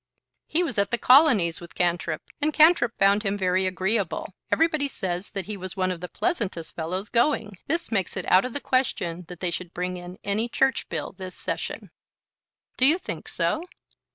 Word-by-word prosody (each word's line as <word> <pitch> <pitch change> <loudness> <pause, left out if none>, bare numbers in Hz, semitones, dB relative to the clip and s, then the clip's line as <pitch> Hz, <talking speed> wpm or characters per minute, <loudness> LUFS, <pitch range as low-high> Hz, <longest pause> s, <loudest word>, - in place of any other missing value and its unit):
"He 345 +3 +1
was 325 - -2
at 200 0 +2
the 235 - 0
Colonies 245 - +5
with 175 - -12
Cantrip, 170 -3 0 0.2
and 300 +1 +2
Cantrip 305 -7 +5
found 200 +1 +4
him 200 -1 -1
very 185 0 +1
agreeable. 190 +1 -1 0.2
Everybody 310 -3 +2
says 185 -7 -4
that 195 -2 -4
he 210 - -4
was 185 0 -7
one 185 -1 +1
of 175 -2 -5
the 180 - -4
pleasantest 205 - -2
fellows 180 +5 -3
going. 225 -6 +1
This 330 0 -2
makes 195 -3 -1
it 185 - -3
out 185 - +6
of 250 - -4
the - - -2
question 180 -9 -1
that 180 -1 -10
they 180 -2 0
should 175 0 -6
bring 180 0 -2
in 175 +1 -9
any 215 +4 -1
Church 265 +2 +1
bill - - -3
this 185 -1 -8
Session." - - -5 0.9
"Do 260 - +6
you 315 +5 +5
think - - -7
so?" 315 - -1
195 Hz, 190 wpm, -25 LUFS, 180-255 Hz, 0.9 s, out